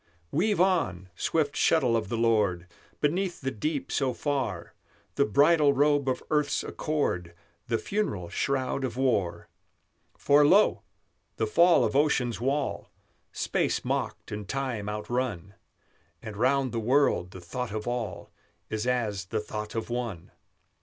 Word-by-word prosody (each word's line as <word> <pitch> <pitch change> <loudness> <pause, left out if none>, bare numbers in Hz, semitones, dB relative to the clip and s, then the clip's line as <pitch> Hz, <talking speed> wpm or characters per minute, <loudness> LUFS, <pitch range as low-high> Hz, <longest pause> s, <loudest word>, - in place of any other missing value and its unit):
Weave 205 +6 +1
on, 130 - +1
swift 150 - 0
shuttle 130 -8 +3
of 110 -3 -1
the 115 - -2
Lord, 105 -7 +2 0.4
Beneath 175 +5 0
the 135 -1 -2
deep 145 +5 -3
so 130 -3 0
far, 130 - -2 0.4
The - - +2
bridal 145 +6 +4
robe 145 -1 +2
of 130 - -2
earth's 150 -1 +1
accord, 90 - -2 0.3
The 115 - +1
funeral 110 - -2
shroud 135 +3 -1
of 125 -2 -3
war! 100 -10 0 0.7
For 145 +1 +4
lo! 195 +8 +4 0.5
the - - 0
fall 175 - +5
of - - -2
Ocean's 135 -6 +1
wall 135 +2 -1 0.4
Space - - -1
mocked - - -3
and 105 -2 -6
time 130 -7 -2
outrun; 105 -3 -3 0.7
And 110 -2 -8
round 130 +3 +2
the 115 - -2
world 125 -5 +2
the 95 - -10
thought 110 +7 -5
of 110 +1 -4
all 120 -5 -4 0.4
Is 110 +2 -2
as 110 -7 -1
the 110 +4 -2
thought 105 0 -6
of 115 +1 -3
one! 120 -8 -4
125 Hz, 140 wpm, -28 LUFS, 105-145 Hz, 0.7 s, fall